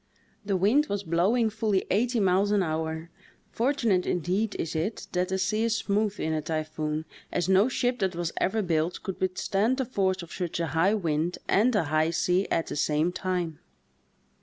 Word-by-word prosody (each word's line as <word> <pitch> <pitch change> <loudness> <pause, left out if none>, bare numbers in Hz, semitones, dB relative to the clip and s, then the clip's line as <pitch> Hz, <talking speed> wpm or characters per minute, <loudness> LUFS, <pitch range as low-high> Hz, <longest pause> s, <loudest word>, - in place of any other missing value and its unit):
The 200 -2 0
wind 235 +11 +3
was 200 0 -2
blowing 200 +7 +2
fully 210 -3 0
eighty 235 +4 +2
miles 195 +1 +3
an 205 -2 +3
hour; 160 0 -3 0.4
fortunate 230 -7 +1
indeed 190 +5 0
is 160 - -3
it 180 +8 -2
that 180 +1 0
the 190 - 0
sea 215 +4 0
is 230 -1 +1
smooth 210 0 0
in 160 - -1
a 155 - 0
typhoon, 155 0 -3 0.3
as 175 -1 0
no 190 +5 +4
ship 245 -1 0
that 190 -3 0
was 170 -1 -2
ever 215 +3 +1
built 165 0 -1
could 190 -2 -5
withstand 195 +6 +1
the 265 - 0
force 190 -6 0
of 170 - -11
such 175 -2 -3
a 170 - +1
high 185 +6 +3
wind 165 -2 -1
and 230 +4 +3
a 205 - +3
high 155 +1 +1
sea 180 +3 +1
at 165 - +1
the - - -5
same 150 +3 +1
time. 180 -4 -2
185 Hz, 185 wpm, -27 LUFS, 165-210 Hz, 0.4 s, no